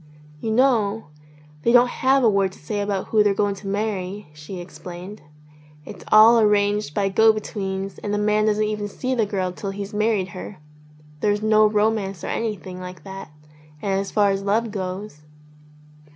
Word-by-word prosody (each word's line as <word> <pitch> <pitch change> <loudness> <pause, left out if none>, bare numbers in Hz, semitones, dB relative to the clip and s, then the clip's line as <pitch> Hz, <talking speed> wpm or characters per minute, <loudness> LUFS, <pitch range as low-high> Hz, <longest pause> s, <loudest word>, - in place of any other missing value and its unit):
"You 225 - -4
know, 225 - +2 0.5
they 235 - +2
don't 245 0 +6
have 265 +2 +2
a - - +6
word 195 -3 +2
to - - -15
say 205 +7 -4
about 200 -2 -2
who 215 - +4
they're 205 -1 +3
going 205 0 +1
to 195 0 -10
marry," 200 -2 -3
she 150 +5 -9
explained. 180 +3 -9 0.6
"It's - - -10
all 225 +2 +8
arranged 205 -5 +2
by 200 -1 +1
go 220 +3 +5
betweens 195 -3 -4
and 205 - -4
the 205 - 0
man 210 +1 +2
doesn't 215 0 +2
even 210 -1 -2
see 255 +5 -3
the 225 -4 +1
girl 190 -3 -2
till 195 +2 -6
he's 200 +1 -6
married 210 -3 0
her. 185 +2 -8 0.6
There's 205 +3 0
no 215 0 +5
romance 210 -3 0
or - - -4
anything 195 -5 -4
like 180 -3 -9
that. 195 -2 -9 0.5
And 195 +1 -1
as 195 - -3
far 205 -2 +3
as 195 0 -1
love 215 +3 0
goes 190 -4 -5
205 Hz, 180 wpm, -22 LUFS, 195-215 Hz, 0.6 s, all